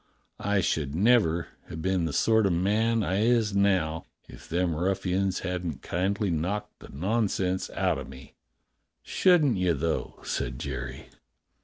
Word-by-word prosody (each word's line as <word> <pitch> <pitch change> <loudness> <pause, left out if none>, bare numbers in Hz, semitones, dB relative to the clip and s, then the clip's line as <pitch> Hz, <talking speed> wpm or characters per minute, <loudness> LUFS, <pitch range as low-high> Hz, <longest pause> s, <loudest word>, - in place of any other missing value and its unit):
I 100 -1 +1
should 75 -4 -1
never 95 -5 +3 0.2
have 80 - -6
been 95 -2 +1
the 80 - -2
sort 110 +8 +3
o' - - +1
man 105 +6 +1
I 95 0 0
is 115 -3 +2
now 90 -5 +1 0.2
if - - -13
them 85 0 0
ruffians 95 +2 0
hadn't 90 -7 -4
kindly 95 +3 -1
knocked 100 +7 -3
the - - -13
nonsense 95 +2 -1
out - - 0
o' - - -5
me." 65 0 -12 0.7
"Shouldn't 155 - +3
you, 90 -2 +2
though.^" 80 +3 -3
said - - -2
Jerry. - - -6
95 Hz, 145 wpm, -27 LUFS, 85-105 Hz, 0.7 s, never